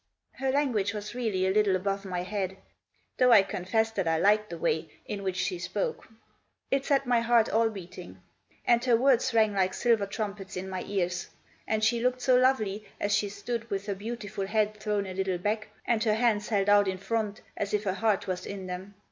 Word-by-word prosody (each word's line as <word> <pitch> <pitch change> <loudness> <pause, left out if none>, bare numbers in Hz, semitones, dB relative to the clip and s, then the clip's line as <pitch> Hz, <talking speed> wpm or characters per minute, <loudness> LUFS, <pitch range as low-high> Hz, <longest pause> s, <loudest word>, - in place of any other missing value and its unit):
Her 265 0 -3
language 235 -8 +1
was 210 +1 -5
really 220 -7 0
a 190 - +2
little 205 -1 +3
above 195 +1 -2
my 180 -2 -3
head. 190 -1 -3 0.6
Though 250 -1 +5
I 210 -4 +8
confess 210 +4 -1
that 195 -6 -2
I 165 0 +2
liked 210 +4 +3
the 170 - -6
way 160 -1 -1 0.2
in 205 - -5
which 190 -2 -2
she 180 -1 -1
spoke. 185 +3 -3 0.6
It 275 0 +2
set 275 -1 +2
my 245 -1 +3
heart 230 -1 +3
all 225 +1 +3
beating. 185 -3 -10 0.5
And 240 0 +4
her 240 -3 +5
words 260 0 +3
rang 220 -3 +3
like 190 -1 +1
silver 230 -4 +2
trumpets 200 -2 -5
in 185 +1 -4
my 185 -1 -3
ears. 180 -3 -1 0.4
And 220 0 0
she 230 +2 +2
looked 250 +1 0
so 255 -1 +4
lovely 220 -5 +2 0.2
as 205 0 +1
she 205 -1 0
stood 230 +3 -5
with 200 0 -3
her 205 - -1
beautiful 205 -1 -5
head 215 0 +1
thrown 210 -1 -1
a 190 - -6
little 190 -1 -1
back, 215 +4 -2 0.2
and 230 -2 +1
her 215 -2 +2
hands 220 -3 +1
held 200 -3 +1
out 205 -1 +5
in 190 0 -1
front 210 +1 -2
as 200 - -3
if 210 0 0
her 190 -3 0
heart 215 0 +1
was 185 -1 -4
in 195 -2 -6
them. 185 +2 -7
205 Hz, 210 wpm, -28 LUFS, 190-225 Hz, 0.6 s, I